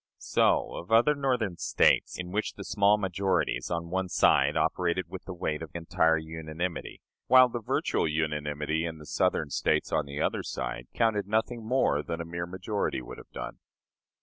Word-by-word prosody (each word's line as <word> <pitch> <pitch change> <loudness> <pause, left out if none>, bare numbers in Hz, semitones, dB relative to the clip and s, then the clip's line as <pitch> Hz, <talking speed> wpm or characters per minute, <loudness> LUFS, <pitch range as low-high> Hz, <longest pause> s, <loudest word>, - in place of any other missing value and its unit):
So - - +2
of 85 - -8
other 120 +6 +5
Northern 125 - -1
States, - - +2
in 90 0 -5
which 105 +3 -1
the 100 - -8
small 100 +1 +3
majorities 95 -1 0
on 85 -1 -3
one 95 0 -1
side - - +3
operated 85 +1 0
with 95 - -8
the 95 - -6
weight 75 -3 -2
of 80 - -6
entire 80 -1 +2
unanimity, 80 +2 -5 0.3
while 130 -1 +7
the 120 0 -4
virtual 105 - 0
unanimity 75 0 -1
in 80 -1 -4
the 75 - -12
Southern 75 0 0
States, - - +1
on 75 -2 0
the 70 +1 -6
other - - 0
side, - - -5
counted 110 -4 +1
nothing 110 +2 -1
more 110 - +2
than 85 +2 -5
a 85 - -4
mere 85 +1 -4
majority 95 -3 -2
would - - -9
have - - -14
done. - - -7
85 Hz, 175 wpm, -28 LUFS, 80-105 Hz, 0.3 s, while